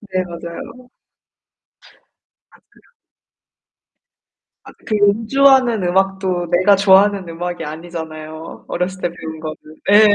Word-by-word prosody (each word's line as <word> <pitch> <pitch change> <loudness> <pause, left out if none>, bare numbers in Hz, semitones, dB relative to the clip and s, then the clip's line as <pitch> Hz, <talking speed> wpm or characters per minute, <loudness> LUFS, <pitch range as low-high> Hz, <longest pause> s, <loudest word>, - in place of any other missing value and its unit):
네, 190 -3 -2
맞아요. 170 +8 -9 1.6
아, - - -22
그런 - - -26 1.7
아, - - -12 0.2
그 215 - 0
연주하는 230 +3 +3
음악도 190 -1 0
내가 185 +3 +4
좋아하는 195 -1 +4
음악이 175 +1 -5
아니잖아요, 160 0 -8
어렸을 185 +2 -3
때 - - +1
배운 160 -2 -8
거는. 155 -1 -5 0.3
예예. 210 0 +7
185 Hz, 235 characters per minute, -18 LUFS, 170-205 Hz, 1.7 s, 예예